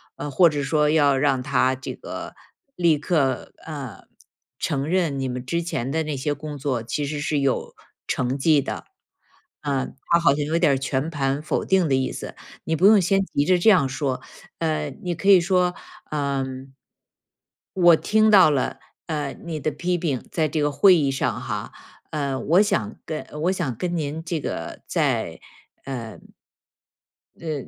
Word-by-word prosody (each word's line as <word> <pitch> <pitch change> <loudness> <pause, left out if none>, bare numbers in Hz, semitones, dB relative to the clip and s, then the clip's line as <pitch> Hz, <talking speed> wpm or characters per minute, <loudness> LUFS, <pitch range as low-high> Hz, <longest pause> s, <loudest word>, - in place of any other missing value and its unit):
呃， 145 - -5
或 175 +5 +6
者 145 -2 -2
说 150 +1 +2
要 145 -3 +4
让 135 -2 +1
他 130 -1 +2
这 130 - -6
个 - - -7 0.4
立 170 -3 +3
刻， 145 -5 0
呃， 140 - -7 0.5
承 140 -2 -1
认 165 -5 0
你 135 - -1
们 125 0 -5
之 170 +6 -1
前 135 -6 -3
的 160 +2 0
那 155 -1 -3
些 145 +2 -1
工 145 0 -7
作 135 -4 -1
其 135 +6 -3
实 145 +1 -3
是 150 0 0
有 135 -2 -1 0.3
成 130 +2 -1
绩 150 +1 +4
的， - - -5 0.8
呃， 140 -3 -1 0.3
他 170 - +6
好 170 - +5
像 145 0 -1
有 160 +3 0
点 170 -4 +4
儿 - - +1
全 135 +3 -2
盘 140 -2 -1
否 155 - -2
定 190 -4 +2
的 135 - +3
意 130 0 0
思， - - -7 0.3
你 160 - -1
不 175 - +2
用 210 -1 +7
先 195 +2 +2
急 145 - 0
着 180 +2 +3
这 195 - +5
样 175 -10 +4
说。 130 -1 -2 0.4
呃， 155 -3 -1
你 180 -1 -1
可 195 - 0
以 190 -3 +8
说： 180 0 +1 0.4
“嗯” 135 -2 -3 1.0
“我 175 -2 +7
听 215 +5 +3
到 190 -7 +7
了， 140 -3 -1 0.3
呃， 150 -4 -3
你 165 -3 -4
的 155 - 0
批 175 +5 -1
评， 145 -7 -2
在 160 -2 +1
这 155 -1 -1
个 145 0 +1
会 185 +6 +6
议 145 -4 +1
上 135 - -1
哈。 - - -4 0.4
呃， 140 -3 -2
我 175 +6 +4
想 115 - -1
跟 155 -1 -4 0.2
我 180 +3 +2
想 165 -11 -2
跟 175 +7 -2
您 160 0 -3
这 165 -1 -2
个 - - -5
再， - - 0 0.8
呃” - - -15 1.2
“呃， 160 -2 -3
150 Hz, 190 characters per minute, -23 LUFS, 135-170 Hz, 1.2 s, 以